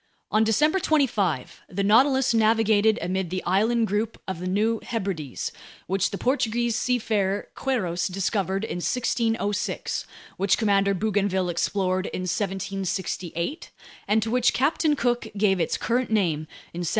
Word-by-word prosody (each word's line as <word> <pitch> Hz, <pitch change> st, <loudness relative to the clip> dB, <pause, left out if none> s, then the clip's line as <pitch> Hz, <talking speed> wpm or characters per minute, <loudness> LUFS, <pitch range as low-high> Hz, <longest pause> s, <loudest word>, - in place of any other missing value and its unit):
On 215 Hz, +1 st, +4 dB
December 300 Hz, -, +3 dB
25 215 Hz, -, 0 dB
the 200 Hz, +2 st, -2 dB
Nautilus 260 Hz, +5 st, +4 dB
navigated 220 Hz, -1 st, +3 dB
amid 185 Hz, 0 st, -1 dB
the 185 Hz, +1 st, -3 dB
island 225 Hz, +6 st, +2 dB
group 215 Hz, +2 st, -2 dB
of 190 Hz, -3 st, -4 dB
the 180 Hz, -, -4 dB
New 215 Hz, +4 st, +1 dB
Hebrides, 190 Hz, -, -4 dB, 0.3 s
which 195 Hz, +1 st, 0 dB
the 200 Hz, -, -5 dB
Portuguese 240 Hz, -2 st, 0 dB
seafarer 215 Hz, -5 st, 0 dB
Queirós 185 Hz, -10 st, -1 dB
discovered 195 Hz, +1 st, -1 dB
in 220 Hz, -, -3 dB
1606, 225 Hz, 0 st, -1 dB, 0.3 s
which 195 Hz, 0 st, +2 dB
Commander 200 Hz, -3 st, +2 dB
Bougainville 195 Hz, -2 st, 0 dB
explored 185 Hz, +2 st, 0 dB
in -, -, -4 dB
1768, 190 Hz, -, -3 dB, 0.4 s
and 215 Hz, +1 st, +3 dB
to 225 Hz, -, -3 dB
which 245 Hz, 0 st, +3 dB
Captain 300 Hz, +2 st, +2 dB
Cook 240 Hz, -4 st, 0 dB
gave 195 Hz, -2 st, +3 dB
its 165 Hz, -, 0 dB
current 245 Hz, +1 st, 0 dB
name 170 Hz, -8 st, +1 dB, 0.3 s
in 170 Hz, -, -6 dB
1773. 175 Hz, -2 st, -1 dB
205 Hz, 140 wpm, -25 LUFS, 185-230 Hz, 0.4 s, On